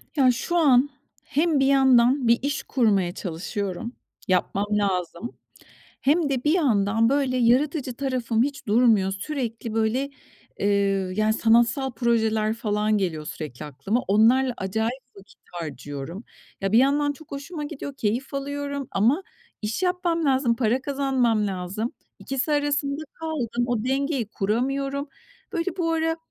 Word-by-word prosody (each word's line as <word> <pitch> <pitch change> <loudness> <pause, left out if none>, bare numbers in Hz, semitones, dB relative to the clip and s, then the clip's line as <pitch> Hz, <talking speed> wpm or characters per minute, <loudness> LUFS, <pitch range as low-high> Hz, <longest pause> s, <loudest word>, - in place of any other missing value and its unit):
Ya, 260 -3 +5
şu 260 +8 -3
an 280 -4 +5 0.3
hem 300 0 +1
bir 270 - +3
yandan 265 -1 +4
bir 235 +1 +5
iş 280 +2 -2
kurmaya 200 -8 +1
çalışıyorum, 195 +4 -4 0.3
yapmam 190 +2 +1
lazım. 195 +1 -1 0.6
Hem 300 +2 +2
de 260 -3 -1
bir 300 - +3
yandan, 225 - +2
böyle, 270 -2 +1
yaratıcı 255 +2 +2
tarafım 250 -4 0
hiç 280 -2 -4
durmuyor. 215 -3 +4
Sürekli, 230 0 -4
böyle, 225 +5 0 0.5
eee, 200 - +1 0.5
yani, 215 +1 +2
sanatsal 235 +4 +3
projeler 220 -3 +1
falan 215 -1 0
geliyor 165 -6 -2
sürekli 150 -3 -6
aklıma. 150 - -2
Onlarla 240 +6 +4
acayip 220 +7 -2
vakit 195 0 -17
harcıyorum. 150 - -6 0.4
Ya, 195 0 -1
bir 220 - +5
yandan 285 +3 +3
çok 300 +2 -16
hoşuma 295 +3 -6
gidiyor, 280 -1 -6
keyif 240 +5 -2
alıyorum 280 0 -3
ama 245 - +2 0.4
iş 220 - -2
yapmam 360 -3 0
lazım, 260 -4 +2
para 240 +2 +1
kazanmam 260 -6 +1
lazım, 195 +5 -3 0.3
ikisi 270 +3 -2
arasında 290 0 0
kaldım. 260 -8 -2
O 240 -3 -1
dengeyi 270 -2 0
kuramıyorum. 275 +7 -1 0.5
Böyle, 340 +2 -2
bu 330 -2 0
ara 325 0 0
245 Hz, 135 wpm, -24 LUFS, 215-280 Hz, 0.6 s, Ya